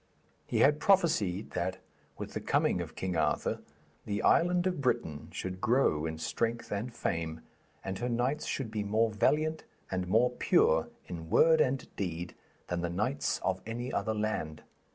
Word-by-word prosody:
He -, -, +1 dB
had 150 Hz, +2 st, +5 dB
prophesied 150 Hz, -, +2 dB
that, 95 Hz, 0 st, -2 dB, 0.4 s
with -, -, -6 dB
the -, -, -2 dB
coming -, -, +1 dB
of -, -, -7 dB
King 95 Hz, -2 st, -2 dB
Arthur, 80 Hz, -, 0 dB, 0.5 s
the 100 Hz, -1 st, -1 dB
island 175 Hz, +1 st, +4 dB
of 180 Hz, -5 st, 0 dB
Britain 80 Hz, -, -1 dB
should 95 Hz, 0 st, -5 dB
grow 115 Hz, -, +2 dB
in 80 Hz, 0 st, -4 dB
strength 115 Hz, +8 st, -2 dB
and 105 Hz, +5 st, -2 dB
fame, 80 Hz, -7 st, -3 dB, 0.4 s
and 95 Hz, 0 st, -3 dB
her 125 Hz, -, -1 dB
knights 125 Hz, +5 st, 0 dB
should 125 Hz, -6 st, -3 dB
be 105 Hz, -1 st, -2 dB
more 110 Hz, +2 st, +2 dB
valiant 155 Hz, +8 st, +1 dB, 0.3 s
and 90 Hz, -1 st, -1 dB
more 115 Hz, +6 st, +4 dB
pure 80 Hz, -9 st, +3 dB, 0.2 s
in 80 Hz, -2 st, -7 dB
word 160 Hz, -, +5 dB
and 130 Hz, -1 st, 0 dB
deed 90 Hz, -2 st, -3 dB, 0.3 s
than 90 Hz, -1 st, -2 dB
the 85 Hz, -, -1 dB
knights 110 Hz, +11 st, 0 dB
of 95 Hz, 0 st, 0 dB
any 120 Hz, +3 st, -4 dB
other 110 Hz, -1 st, 0 dB
land. 105 Hz, -8 st, -2 dB
110 Hz, 165 wpm, -31 LUFS, 90-130 Hz, 0.5 s, had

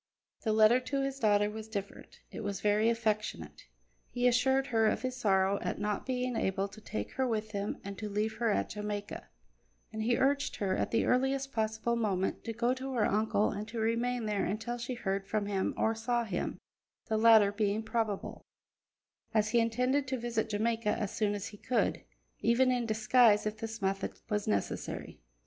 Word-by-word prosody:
The 220 Hz, -, 0 dB
letter 220 Hz, +3 st, +6 dB
to 275 Hz, +2 st, -2 dB
his 275 Hz, 0 st, -3 dB
daughter 205 Hz, -2 st, +3 dB
was 215 Hz, +1 st, -6 dB
different; 200 Hz, -2 st, -7 dB
it -, -, -7 dB
was 200 Hz, -1 st, -3 dB
very 210 Hz, +2 st, +3 dB
affectionate. 210 Hz, -, -2 dB, 0.4 s
He 245 Hz, 0 st, +1 dB
assured 265 Hz, +2 st, +3 dB
her 225 Hz, -1 st, +4 dB
of 215 Hz, -, 0 dB
his 255 Hz, 0 st, -2 dB
sorrow 195 Hz, -4 st, +2 dB
at -, -, -2 dB
not 210 Hz, 0 st, -2 dB
being 250 Hz, -1 st, -1 dB
able 195 Hz, -2 st, 0 dB
to 215 Hz, +2 st, -13 dB
take 105 Hz, -, -5 dB
her 260 Hz, -1 st, 0 dB
with 215 Hz, -2 st, -2 dB
him 200 Hz, 0 st, -3 dB
and 200 Hz, 0 st, -6 dB
to 215 Hz, -1 st, -4 dB
leave 210 Hz, +2 st, -1 dB
her 235 Hz, -1 st, +1 dB
at 205 Hz, -, 0 dB
Jamaica, 210 Hz, -1 st, -5 dB, 0.7 s
and 220 Hz, -, -3 dB
he 235 Hz, +2 st, +2 dB
urged 280 Hz, +2 st, +1 dB
her 195 Hz, -4 st, 0 dB
at -, -, -1 dB
the 230 Hz, -, +1 dB
earliest 270 Hz, +2 st, +1 dB
possible 220 Hz, +1 st, 0 dB
moment 195 Hz, -5 st, -1 dB
to 230 Hz, -, -2 dB
go 235 Hz, +2 st, +1 dB
to 260 Hz, +1 st, -5 dB
her 230 Hz, -4 st, +2 dB
uncle 215 Hz, 0 st, +1 dB
and 210 Hz, +1 st, -5 dB
to 230 Hz, +1 st, -5 dB
remain 230 Hz, +1 st, 0 dB
there 210 Hz, -2 st, 0 dB
until 225 Hz, +5 st, -3 dB
she 245 Hz, +1 st, -4 dB
heard 195 Hz, -3 st, -2 dB
from 210 Hz, 0 st, -1 dB
him 195 Hz, -2 st, 0 dB
or 220 Hz, -, +2 dB
saw 235 Hz, +2 st, 0 dB
him 200 Hz, -6 st, -3 dB, 0.5 s
the 220 Hz, -, -1 dB
latter 220 Hz, -2 st, +6 dB
being 210 Hz, +1 st, 0 dB
probable, 220 Hz, -3 st, -2 dB, 0.9 s
as 215 Hz, 0 st, +3 dB
he 235 Hz, -, +3 dB
intended 250 Hz, +5 st, +1 dB
to 260 Hz, 0 st, -1 dB
visit 230 Hz, -2 st, -2 dB
Jamaica 220 Hz, +1 st, 0 dB
as 210 Hz, -3 st, -2 dB
soon 205 Hz, -2 st, 0 dB
as 200 Hz, -, -5 dB
he 205 Hz, -, -12 dB
could, 230 Hz, -1 st, 0 dB, 0.4 s
even 250 Hz, +3 st, +3 dB
in 245 Hz, -2 st, 0 dB
disguise 220 Hz, 0 st, +4 dB
if 215 Hz, 0 st, -2 dB
this 225 Hz, -1 st, -6 dB
method 195 Hz, 0 st, -1 dB
were 210 Hz, -1 st, +1 dB
necessary. 100 Hz, -2 st, -3 dB
220 Hz, 190 wpm, -31 LUFS, 205-240 Hz, 0.9 s, letter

